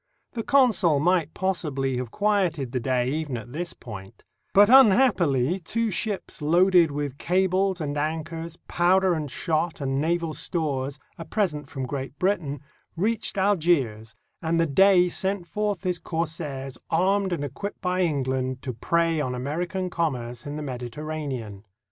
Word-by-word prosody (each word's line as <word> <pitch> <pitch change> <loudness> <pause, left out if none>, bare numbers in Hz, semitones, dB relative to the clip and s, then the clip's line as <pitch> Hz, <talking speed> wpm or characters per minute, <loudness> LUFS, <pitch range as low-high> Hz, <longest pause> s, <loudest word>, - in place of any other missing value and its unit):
The 230 - -2
consul 225 - +3
might 165 -1 +1
possibly 145 -9 -1
have 125 -2 -3
quieted 180 - 0
the 125 - -1
Dey 125 0 0
even 150 -4 -2
on 120 +1 -9
this 170 +5 -4
point; 95 -5 -10 0.3
but, 205 +1 +7
unhappily, 195 - +5
two 225 +6 -1
ships 200 -3 -3
loaded 175 +2 +4
with 145 -1 -4
cables 185 +1 +1
and 145 -2 -3
anchors, 160 +2 -3
powder 185 +1 +3
and 155 -3 -3
shot, 165 +4 -1
and 135 -1 -1
naval 165 0 0
stores, 145 -5 -2 0.2
a - - -4
present 160 -7 -1
from 135 -2 -4
Great 135 +1 -5
Britain, 165 -8 -1 0.4
reached 215 +3 0
Algiers, 155 - +1 0.3
and 165 0 0
the 165 - +4
Dey 180 +4 +5
sent 190 +1 -1
forth 205 +2 -2
his 180 -2 -1
corsairs, 145 -6 -4
armed 190 +3 +2
and 165 -5 -2
equipped 145 +9 -6
by 180 0 0
England, 130 -5 -1
to 130 - -3
prey 165 +6 +1
on 125 -3 -2
American 175 +8 -3
commerce 125 -7 -3
in 145 - -5
the 150 - -4
Mediterranean. 130 -4 -5
160 Hz, 150 wpm, -25 LUFS, 135-185 Hz, 0.4 s, but